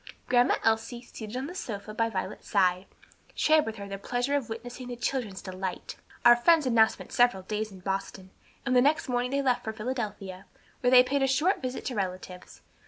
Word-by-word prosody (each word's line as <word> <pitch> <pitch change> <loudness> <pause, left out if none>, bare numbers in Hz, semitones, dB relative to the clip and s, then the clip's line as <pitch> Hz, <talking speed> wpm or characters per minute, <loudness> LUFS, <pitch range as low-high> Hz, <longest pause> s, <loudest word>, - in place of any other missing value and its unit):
Grandma 245 0 +4
Elsie, 225 +2 0
seated 220 -1 -8
on 260 - -3
the 340 - -7
sofa 215 - -6
by 230 +1 0
Violet's - - -5
side, 185 -2 +2 0.5
shared 310 -3 +3
with 220 - -4
her 200 -2 -8
the 195 0 -6
pleasure 245 +6 -1
of 270 -6 -2
witnessing 245 +3 -7
the 245 - -5
children's 235 -5 -3
delight. 185 -1 -5 0.3
Our 240 0 +9
friends 320 +6 +4
had 255 - +1
now 220 -1 +7
spent - - -10
several 245 -6 +3
days 215 +2 -3
in 190 -1 -12
Boston, 190 0 -4 0.3
and 260 -1 +1
the 250 - +6
next 295 +4 +2
morning 245 0 0
they 280 +1 0
left 250 -2 +1
for 220 - -4
Philadelphia, 210 -5 -5 0.3
where 245 - +2
they 250 0 +8
paid 275 +2 -1
a 270 - +3
short 310 +9 +2
visit 255 0 -4
to 255 - -2
relatives. 185 -3 -6
235 Hz, 205 wpm, -28 LUFS, 200-255 Hz, 0.5 s, Our